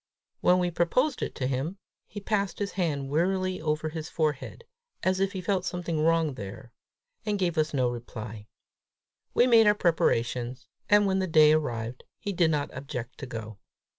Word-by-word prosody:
When 180 - +4
we 180 -1 +1
proposed 250 - +1
it - - -3
to 130 - -2
him, 135 +8 -2 0.3
he 205 - -7
passed 200 -2 -1
his 205 -1 -2
hand 145 -7 -2
wearily 185 +4 0
over 155 0 -1
his 160 0 -6
forehead, 155 -4 -2 0.4
as 185 0 +2
if 195 0 +1
he 190 - -4
felt 185 0 0
something 175 -4 -2
wrong 165 -2 +2
there, 115 +2 -8 0.5
and 210 -1 0
gave 180 -3 0
us 155 -1 +1
no 130 -3 +1
reply. 110 -3 -6 0.9
We 245 - +6
made 230 -3 +6
our 210 - +6
preparations, 125 - 0 0.2
and 205 0 +6
when 190 -1 +1
the 190 - 0
day 155 -2 +6
arrived, 120 -6 -1
he 205 - -4
did 170 -3 +3
not 150 -2 -1
object 130 -2 -6
to 135 - -6
go. 110 -3 -7
160 Hz, 175 wpm, -28 LUFS, 130-185 Hz, 0.9 s, We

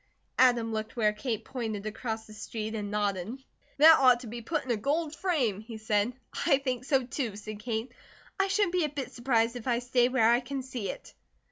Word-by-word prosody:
Adam 240 -3 +4
looked 215 0 -4
where 215 -3 +2
Kate 225 0 -3
pointed 220 -5 -4
across 220 +1 -4
the 215 - -13
street, 215 +1 -5
and 210 -2 -3
nodded. 205 +2 -1 0.4
"That 315 +2 +8
ought 250 -2 +5
to - - -9
be 235 +2 -6
put 305 +5 -2
in 255 - -2
a - - +3
gold 295 +7 -1
frame," 270 - 0
he 225 0 -8
said. 215 +1 0 0.3
"I 280 -5 +6
think 255 -2 -3
so, 270 -2 +2
too," 240 -4 -3
said 210 0 -7
Kate. 230 +1 -3 0.5
"I 390 - +3
shouldn't 390 -2 +1
be 360 -2 +2
a - - -2
bit 275 -2 -5
surprised 235 -1 +1
if 245 0 -7
I 240 -2 +2
stay 245 0 +2
where 250 -4 +3
I 240 - +4
can 265 +1 -5
see 245 -6 -5
it." - - -8
240 Hz, 215 wpm, -29 LUFS, 220-265 Hz, 0.5 s, That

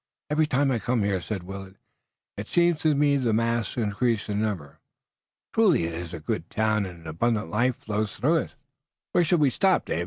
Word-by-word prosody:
"Every 155 +1 +3
time 140 -1 +2
I 120 - 0
come 120 -1 0
here," 100 -2 0
said 90 +3 -4
Willet, 95 +1 -8 0.6
"it 100 +2 -6
seems 175 -2 +2
to 155 -2 +3
me 145 0 +3
that 135 - -2
the 115 -3 +2
masts 115 0 0
increase 110 0 0
in 105 0 0
number. 95 -10 -3 0.7
Truly 210 - +4
it 85 0 -3
is 85 0 -6
a 85 - -6
good 75 - -3
town, 110 -2 +1
and 85 -2 -11
an 80 - -11
abundant 105 +3 -1
life 120 +5 +2
flows 105 -1 -3
through 150 +10 +2
it." 155 - -3 0.6
"Where 175 - +3
shall 170 +2 +2
we 145 -4 +3
stop, 190 +4 +2
Dave?" - - -2
110 Hz, 210 wpm, -26 LUFS, 95-140 Hz, 0.7 s, Truly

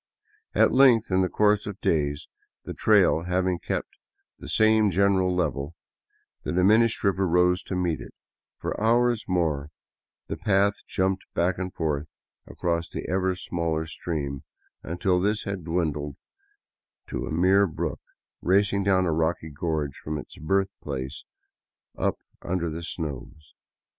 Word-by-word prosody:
At - - +5
length, 125 -5 +5
in 95 0 +3
the 90 - +1
course 105 -1 +2
of 100 -1 -6
days, 75 -2 0 0.4
the - - -6
trail 95 -6 +3
having 90 0 0
kept - - -4 0.4
the - - -9
same 110 -1 +4
general 95 0 +2
level, 75 -2 -2 0.7
the - - -4
diminished 110 +6 +3
river 100 -1 +2
rose 90 +1 +3
to 95 - -5
meet 90 -3 -1
it; - - -11 0.4
for - - -4
hours 120 +1 +3
more 80 -6 0 0.6
the - - -5
path 100 0 +2
jumped 95 0 -1
back 90 +2 +1
and 95 -1 -3
forth 75 -3 -2 0.4
across 85 -1 -2
the - - -6
ever 95 0 0
smaller 85 -3 -2
stream, 75 -5 -4 0.4
until 90 +2 0
this 105 +2 0
had 100 -3 -4
dwindled 75 -4 -1 0.9
to - - -3
a - - -5
mere 95 +5 +4
brook 80 - -4 0.4
racing 100 +2 +2
down 95 -1 +3
a 85 - +1
rocky 80 0 -1
gorge 75 -2 -2
from 75 0 -4
its - - -9
birth 95 +5 +1
place 65 -2 -5 0.7
up - - 0 0.3
under 85 -2 -2
the 80 +2 -5
snows. 75 -2 -6
90 Hz, 145 wpm, -26 LUFS, 80-100 Hz, 0.9 s, At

